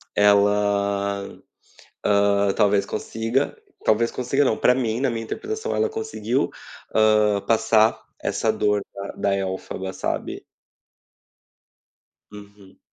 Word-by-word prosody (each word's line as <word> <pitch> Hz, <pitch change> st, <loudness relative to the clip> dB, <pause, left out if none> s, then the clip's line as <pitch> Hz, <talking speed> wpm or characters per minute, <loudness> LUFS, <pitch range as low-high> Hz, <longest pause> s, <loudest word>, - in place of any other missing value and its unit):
ela, 100 Hz, -1 st, +2 dB, 0.7 s
hã, 100 Hz, -1 st, +3 dB
talvez 105 Hz, -2 st, +2 dB
consiga, 115 Hz, +5 st, -2 dB, 0.3 s
talvez 115 Hz, +2 st, +2 dB
consiga 135 Hz, +3 st, 0 dB
não, 110 Hz, -, +1 dB
pra 125 Hz, -, +4 dB
mim 120 Hz, -2 st, -1 dB
na 135 Hz, -, +1 dB
minha 115 Hz, -1 st, -4 dB
interpretação 435 Hz, -, -4 dB
ela 445 Hz, -, +1 dB
conseguiu, 445 Hz, 0 st, -2 dB, 0.4 s
hã, 105 Hz, -1 st, +4 dB
passar 110 Hz, -1 st, +3 dB, 0.2 s
essa -, -, 0 dB
dor 105 Hz, -1 st, +1 dB
da 100 Hz, 0 st, -6 dB
da 100 Hz, -, 0 dB
elfoba, 95 Hz, 0 st, -4 dB
sabe? -, -, -4 dB, 1.9 s
Uhum. 100 Hz, -2 st, -14 dB
105 Hz, 105 wpm, -23 LUFS, 100-115 Hz, 1.9 s, pra